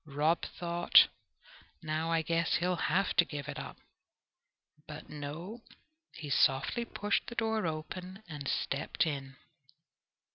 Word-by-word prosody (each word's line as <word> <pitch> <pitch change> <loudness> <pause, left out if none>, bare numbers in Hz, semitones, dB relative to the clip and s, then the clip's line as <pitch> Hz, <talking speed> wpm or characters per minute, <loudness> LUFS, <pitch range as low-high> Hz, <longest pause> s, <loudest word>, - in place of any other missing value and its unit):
Rob 155 +4 +2
thought, 175 0 +5 0.7
"Now 155 +1 -1
I 165 -1 +2
guess 165 +1 +1
he'll 180 +2 +1
have 190 +3 +1
to - - +8
give 145 -3 -6
it 150 - -5
up." - - -7 1.1
But 150 0 -9
no, 155 +10 -6 0.5
he 150 -4 -7
softly 135 - +3
pushed 205 -2 -1
the 235 - -7
door 220 -4 0
open 180 +5 -5
and 145 -4 -6
stepped 140 +4 0
in. 135 -3 -4
165 Hz, 130 wpm, -32 LUFS, 150-180 Hz, 1.1 s, to